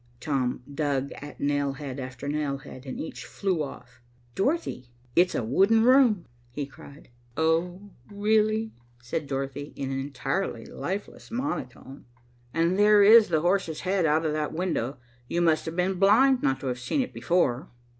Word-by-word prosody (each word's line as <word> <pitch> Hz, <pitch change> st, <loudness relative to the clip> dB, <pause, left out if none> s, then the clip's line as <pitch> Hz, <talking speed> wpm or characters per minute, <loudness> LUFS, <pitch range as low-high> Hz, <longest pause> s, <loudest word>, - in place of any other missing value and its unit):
Tom 125 Hz, -2 st, -1 dB
dug 140 Hz, -2 st, -1 dB
at 145 Hz, +1 st, -10 dB
nail 145 Hz, -1 st, 0 dB
head 140 Hz, -1 st, -7 dB
after 130 Hz, +1 st, -7 dB
nail 145 Hz, -1 st, -1 dB
head, 135 Hz, 0 st, -12 dB
and 130 Hz, -, -5 dB
each -, -, -6 dB
flew 190 Hz, -5 st, -2 dB
off. 125 Hz, -3 st, -8 dB, 0.3 s
"Dorothy, 195 Hz, -, -1 dB, 0.3 s
it's 180 Hz, +1 st, +4 dB
a -, -, 0 dB
wooden 195 Hz, -, +3 dB
room," 245 Hz, -7 st, +5 dB, 0.2 s
he 140 Hz, +4 st, -4 dB
cried. 140 Hz, +1 st, -15 dB, 0.3 s
"Oh, 175 Hz, +5 st, 0 dB, 0.2 s
really," 215 Hz, +2 st, +1 dB, 0.3 s
said 145 Hz, +5 st, -3 dB
Dorothy, 135 Hz, +1 st, -4 dB
in 135 Hz, -1 st, -4 dB
an 135 Hz, -, -2 dB
entirely 140 Hz, +8 st, -3 dB
lifeless 195 Hz, +2 st, -6 dB
monotone. 185 Hz, -, -5 dB, 0.5 s
"And 170 Hz, +5 st, +1 dB
there 210 Hz, 0 st, +6 dB
is 220 Hz, +1 st, +8 dB
the 160 Hz, -3 st, +1 dB
horse's 175 Hz, -2 st, 0 dB
head 185 Hz, -2 st, +1 dB
out 155 Hz, +2 st, +2 dB
of 155 Hz, -, 0 dB
that 155 Hz, -1 st, -2 dB
window. 155 Hz, -7 st, -2 dB, 0.3 s
You 170 Hz, -, -1 dB
must 160 Hz, -2 st, +2 dB
have 160 Hz, -, -4 dB
been 180 Hz, +1 st, 0 dB
blind 245 Hz, +7 st, +5 dB
not 135 Hz, -, +1 dB
to -, -, -6 dB
have 125 Hz, -1 st, -2 dB
seen 265 Hz, -, 0 dB
it 255 Hz, -, -4 dB
before." 140 Hz, -8 st, 0 dB
160 Hz, 165 wpm, -27 LUFS, 135-200 Hz, 0.5 s, is